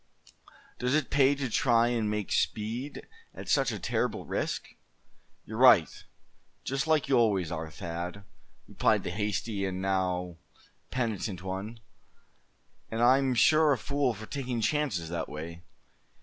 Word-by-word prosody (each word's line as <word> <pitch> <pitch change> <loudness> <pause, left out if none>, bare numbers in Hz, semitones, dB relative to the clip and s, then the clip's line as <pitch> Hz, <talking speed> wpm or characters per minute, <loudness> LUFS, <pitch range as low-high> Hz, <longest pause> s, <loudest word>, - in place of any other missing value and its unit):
Does 125 +3 +1
it 155 - 0
pay 140 0 +4
to 140 -2 -2
try 120 0 +3
and 115 -3 0
make 105 -3 -3
speed 115 +7 -2 0.3
at - - -9
such - - +2
a - - -4
terrible - - -2
risk?" - - -3 0.8
"You're 110 +1 -6
right, 120 -11 +7 0.8
just 135 +3 -2
like 155 -3 +2
you 130 -3 +4
always 100 -7 +2
are, 80 -1 -4
Thad," 85 +5 -6 0.4
replied - - +1
the - - -3
hasty 105 +1 -2
and 95 -1 -2
now 90 -2 -1 0.5
penitent 110 -6 -3
one; 100 +5 -5 1.1
"and 115 +1 -1
I'm 130 +1 +4
sure 155 +3 +5
a - - -1
fool 140 +1 0
for 110 +2 -8
taking 125 -1 -3
chances 110 - 0
that 85 -1 -3
way. 85 +3 -7
110 Hz, 140 wpm, -29 LUFS, 95-130 Hz, 1.1 s, right